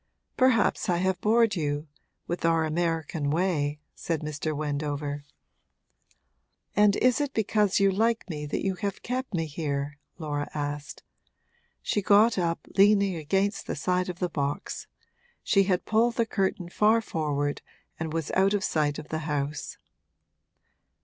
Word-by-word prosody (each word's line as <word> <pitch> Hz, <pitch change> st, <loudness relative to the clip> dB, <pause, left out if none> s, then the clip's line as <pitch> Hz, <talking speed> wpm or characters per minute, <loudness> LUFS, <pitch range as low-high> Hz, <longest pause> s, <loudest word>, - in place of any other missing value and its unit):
Perhaps 240 Hz, -5 st, +3 dB
I 175 Hz, -, +3 dB
have 185 Hz, 0 st, 0 dB
bored 225 Hz, 0 st, +3 dB
you 150 Hz, -2 st, -2 dB, 0.4 s
with 175 Hz, -, -4 dB
our 165 Hz, -1 st, +3 dB
American 160 Hz, -2 st, -1 dB
way,' 150 Hz, -3 st, 0 dB
said 165 Hz, -3 st, -3 dB
Mr. 150 Hz, 0 st, -3 dB
Wendover. 145 Hz, -1 st, -3 dB, 1.5 s
'And 205 Hz, -1 st, +5 dB
is 255 Hz, +3 st, +3 dB
it 285 Hz, -2 st, -3 dB
because 210 Hz, -2 st, +2 dB
you 195 Hz, 0 st, +4 dB
like 225 Hz, +4 st, +1 dB
me 150 Hz, -4 st, -5 dB
that 145 Hz, -, -2 dB
you 195 Hz, -, +1 dB
have 200 Hz, +1 st, -4 dB
kept 255 Hz, -3 st, -3 dB
me 165 Hz, -1 st, 0 dB
here?' 145 Hz, -1 st, -3 dB, 0.2 s
Laura 145 Hz, -3 st, -3 dB
asked. 145 Hz, 0 st, -4 dB, 0.8 s
She 205 Hz, -, 0 dB
got 205 Hz, +2 st, +5 dB
up, 170 Hz, -1 st, -1 dB
leaning 200 Hz, -1 st, +5 dB
against 195 Hz, +6 st, -1 dB
the -, -, -2 dB
side 180 Hz, +4 st, 0 dB
of 180 Hz, -, -5 dB
the 180 Hz, -, 0 dB
box; 145 Hz, -3 st, -3 dB, 0.6 s
she 195 Hz, -2 st, +3 dB
had 185 Hz, -2 st, 0 dB
pulled 230 Hz, +2 st, +2 dB
the 230 Hz, -, +2 dB
curtain 190 Hz, -4 st, -1 dB
far 215 Hz, +5 st, +3 dB
forward 145 Hz, -6 st, -2 dB, 0.4 s
and 160 Hz, -1 st, -3 dB
was 165 Hz, -2 st, -2 dB
out 195 Hz, +2 st, +3 dB
of 205 Hz, -, -1 dB
sight 150 Hz, -5 st, 0 dB
of 150 Hz, -, -8 dB
the 155 Hz, -, -2 dB
house. 145 Hz, 0 st, -3 dB
170 Hz, 150 wpm, -27 LUFS, 150-200 Hz, 1.5 s, And